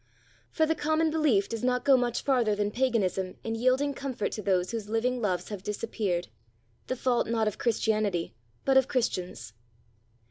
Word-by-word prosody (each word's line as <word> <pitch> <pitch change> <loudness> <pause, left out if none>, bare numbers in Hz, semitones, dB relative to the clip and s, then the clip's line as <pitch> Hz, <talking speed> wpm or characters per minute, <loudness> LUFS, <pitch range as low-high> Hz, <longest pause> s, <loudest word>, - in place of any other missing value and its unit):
For 315 - +2
the 320 - +1
common 315 +1 +1
belief 290 -11 +2
does 230 0 -5
not 250 0 +1
go 275 - +7
much 245 -2 0
farther 240 -6 +2
than 205 0 -1
paganism 205 -7 0
in 225 - -3
yielding 255 +5 +2
comfort 265 -6 -3
to 215 - -4
those 185 -3 +1
whose 220 -3 -4
living 245 +3 0
loves 185 -4 -1
have 205 -3 -5
disappeared 205 -3 -2 0.6
the 255 - -1
fault 250 -1 +1
not 225 -1 +1
of 215 - -3
Christianity, 215 -6 0 0.3
but 270 -1 +4
of 265 -1 +4
Christians. 185 - -2
230 Hz, 170 wpm, -28 LUFS, 205-255 Hz, 0.6 s, go